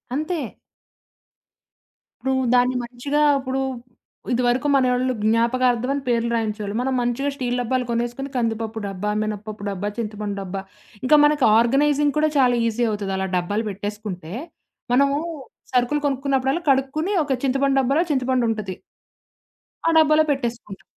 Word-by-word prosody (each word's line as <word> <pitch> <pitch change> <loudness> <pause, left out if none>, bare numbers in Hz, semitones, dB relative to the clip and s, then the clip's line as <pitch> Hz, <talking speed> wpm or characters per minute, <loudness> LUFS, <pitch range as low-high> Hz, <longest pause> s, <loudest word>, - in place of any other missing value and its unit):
అంతే. 310 +2 -2 1.8
ఇప్పుడు 265 0 0 0.2
దాన్ని 250 +1 +3
మంచిగా, 250 +5 -2 0.2
ఇప్పుడు 265 0 -3 0.7
ఇదివరకు 245 +3 +1
మనోళ్ళు 255 -1 +2
జ్ఞాపకార్థమని 245 +4 +2
పేర్లు 235 0 +1
రాయించేవాళ్ళు. 215 -2 -2
మనం 265 +1 -1
మంచిగా 245 +4 0
స్టీల్ 245 -2 -2
డబ్బాలు 250 +1 -1
కొనేసుకొని 240 +4 -2
కందిపప్పు 225 -2 -1
డబ్బా, 195 +2 -3
మినపప్పు 215 0 -5
డబ్బా, 200 +1 -3
చింతపండు 210 -2 -4
డబ్బా, 195 0 -5 0.4
ఇంకా 280 +4 +5
మనకి 295 -2 +2
ఆర్గనైజింగ్ 285 +4 +3
కూడా 310 0 +3
చాలా 250 -2 +4
ఈజీ 235 +2 0
అవుతది. 200 -2 -3
అలా 190 - -1
డబ్బాలు 205 +5 -1
పెట్టేసుకుంటే. 205 -4 -6 0.6
మనము 280 +2 +3 0.5
సరుకులు 250 +4 +2
కొనుక్కున్నప్పుడల్లా 270 +3 0
కడుక్కొని, 275 +7 +1
ఒక 275 -2 0
చింతపండు 275 +1 +2
డబ్బాలో 275 +5 +2
చింతపండుంటది. 235 -7 0 1.1
ఆ - - +5
డబ్బులో 310 0 +5
పెట్టేసుకుంటా 235 -7 -3
245 Hz, 120 wpm, -22 LUFS, 220-275 Hz, 1.8 s, ఇంకా